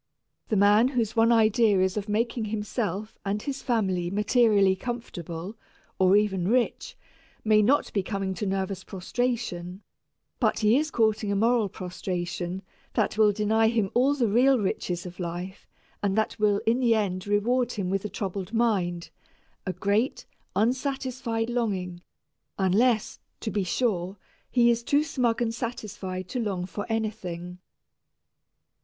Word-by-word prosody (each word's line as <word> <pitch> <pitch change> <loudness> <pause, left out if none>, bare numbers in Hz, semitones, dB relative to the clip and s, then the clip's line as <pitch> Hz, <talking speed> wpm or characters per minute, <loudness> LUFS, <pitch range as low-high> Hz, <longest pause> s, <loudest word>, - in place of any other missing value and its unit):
The 220 - +1
man 205 +4 +5
whose 240 -4 -1
one 230 +1 +4
idea 220 -2 +4
is 185 0 +1
of 210 0 -3
making 230 +2 0
himself 210 -1 -3
and 200 +1 -1
his 275 +4 -5
family 190 -8 0
materially 205 -1 +3
comfortable, 190 -4 -6 0.4
or 190 +1 +5
even 195 -4 +1
rich, 240 +2 0 0.5
may 215 -1 +5
not 265 +8 +2
be 200 - +1
coming 195 0 -3
to 205 +2 -3
nervous 190 0 -2
prostration, 195 -3 -3 0.6
but - - +2
he 215 +2 +4
is 305 +3 +1
courting 220 -4 +1
a - - +1
moral 225 0 +2
prostration 180 0 -4 0.3
that - - +1
will 215 -1 +5
deny 220 +2 +2
him 220 -4 +1
all 265 +4 +3
the 245 -5 +1
real 255 +6 +4
riches 185 -4 -2
of 180 +1 -9
life 180 +2 -5 0.3
and 195 -1 0
that 220 0 0
will 205 -1 +2
in 230 +3 +2
the 235 -3 +3
end 190 -3 -1
reward 240 +4 +1
him 190 -4 -2
with 195 0 0
a 210 - -3
troubled 195 -1 -4
mind, 185 -7 0 0.6
a 185 - -1
great, 200 +8 0 0.3
unsatisfied 255 0 -1
longing, 195 -7 -2 0.6
unless, 215 +4 +2 0.2
to 220 - -4
be 205 - 0
sure, 190 -1 -1 0.3
he 240 -1 +4
is 235 0 0
too 285 +5 +2
smug 245 -6 0
and 230 -1 -1
satisfied 210 -6 -5
to 250 - -3
long 195 -6 -2
for 195 +3 -6
anything. 185 -6 -4
210 Hz, 150 wpm, -26 LUFS, 190-235 Hz, 0.6 s, man